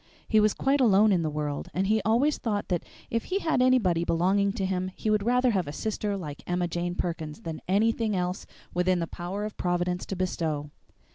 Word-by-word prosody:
He 220 Hz, -, +4 dB
was 215 Hz, 0 st, +3 dB
quite 275 Hz, +1 st, +2 dB
alone 215 Hz, -2 st, +5 dB
in 180 Hz, -3 st, +3 dB
the 155 Hz, -, 0 dB
world, 150 Hz, -1 st, -3 dB
and 190 Hz, +2 st, +1 dB
he 215 Hz, +2 st, +2 dB
always 235 Hz, +9 st, +2 dB
thought 210 Hz, -4 st, -2 dB
that 175 Hz, -3 st, 0 dB, 0.3 s
if 230 Hz, 0 st, -1 dB
he 380 Hz, -, -1 dB
had 320 Hz, -9 st, +1 dB
anybody 215 Hz, -10 st, +3 dB
belonging 190 Hz, +4 st, +2 dB
to 195 Hz, -, -2 dB
him 185 Hz, 0 st, -1 dB
he 215 Hz, -, -1 dB
would 210 Hz, -1 st, +3 dB
rather 250 Hz, +3 st, +3 dB
have 185 Hz, -6 st, 0 dB
a -, -, -4 dB
sister 210 Hz, +3 st, -2 dB
like 150 Hz, -6 st, -7 dB
Emma 175 Hz, 0 st, 0 dB
Jane 175 Hz, +1 st, -3 dB
Perkins 165 Hz, 0 st, -4 dB
than 165 Hz, -6 st, -6 dB
anything 215 Hz, +2 st, +2 dB
else 180 Hz, +1 st, -2 dB, 0.3 s
within 180 Hz, +1 st, +2 dB
the 170 Hz, -, -1 dB
power 180 Hz, +5 st, -5 dB
of 215 Hz, -, -7 dB
Providence 180 Hz, 0 st, 0 dB
to 195 Hz, -, -3 dB
bestow. 160 Hz, -5 st, -2 dB
190 Hz, 210 wpm, -27 LUFS, 175-215 Hz, 0.3 s, alone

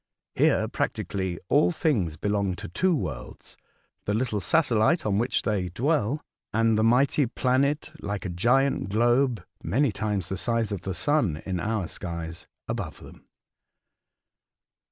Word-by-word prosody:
Here, -, -, +3 dB
practi -, -, -2 dB
cally, 95 Hz, -3 st, -2 dB
all 90 Hz, -, +4 dB
things 95 Hz, -, 0 dB
belong 100 Hz, 0 st, 0 dB
to -, -, -7 dB
two 180 Hz, -, +1 dB
worlds, 65 Hz, -, -6 dB, 0.5 s
the 105 Hz, -, 0 dB
little 110 Hz, -3 st, 0 dB
satelHte 130 Hz, -, +2 dB
on 100 Hz, -1 st, +1 dB
which 120 Hz, +3 st, 0 dB
they 100 Hz, -4 st, 0 dB
dwell 140 Hz, -, 0 dB, 0.3 s
and 115 Hz, 0 st, +3 dB
the 110 Hz, -, +2 dB
mighty 130 Hz, +4 st, +3 dB
planet, 140 Hz, +5 st, +1 dB
like 100 Hz, 0 st, -4 dB
a -, -, -2 dB
giant 120 Hz, +6 st, +2 dB
globe 120 Hz, +3 st, +2 dB, 0.2 s
(many 135 Hz, +2 st, +1 dB
times 105 Hz, -4 st, -2 dB
the 95 Hz, -, -2 dB
size 115 Hz, +1 st, 0 dB
of 100 Hz, -4 st, -3 dB
the 95 Hz, -1 st, -4 dB
sun 110 Hz, -, +1 dB
in 95 Hz, -2 st, -2 dB
our 105 Hz, -1 st, -1 dB
skies), 85 Hz, -1 st, -6 dB, 0.2 s
above -, -, -4 dB
them." -, -, -14 dB
110 Hz, 145 wpm, -26 LUFS, 95-130 Hz, 0.5 s, all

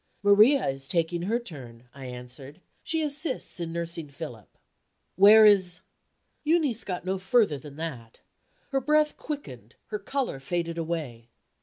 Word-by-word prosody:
"Maria 215 Hz, +7 st, +5 dB
is 135 Hz, 0 st, -4 dB
taking 170 Hz, +2 st, 0 dB
her 210 Hz, +7 st, 0 dB
turn," 130 Hz, -, -10 dB
I 135 Hz, -1 st, -10 dB
answered; 125 Hz, +5 st, -9 dB, 0.2 s
"she 320 Hz, -1 st, -1 dB
assists 295 Hz, -, -2 dB
in 170 Hz, -1 st, -4 dB
nursing 170 Hz, -2 st, -5 dB
Philip." 135 Hz, -7 st, -10 dB, 0.6 s
"Where 210 Hz, +3 st, +8 dB
is 185 Hz, -4 st, +5 dB, 0.3 s
?" -, -, -47 dB
Euneece 300 Hz, -7 st, +2 dB
got 180 Hz, -2 st, -5 dB
no 190 Hz, +1 st, -1 dB
further 195 Hz, -, +2 dB
than 140 Hz, +1 st, -11 dB
that. 135 Hz, -8 st, -7 dB, 0.5 s
Her 270 Hz, -1 st, +1 dB
breath 300 Hz, +2 st, +2 dB
quickened, 125 Hz, -, -8 dB
her 210 Hz, -, -3 dB
color 255 Hz, -, -3 dB
faded 170 Hz, +4 st, -3 dB
away. 150 Hz, -9 st, -4 dB
170 Hz, 145 wpm, -27 LUFS, 140-225 Hz, 0.6 s, Where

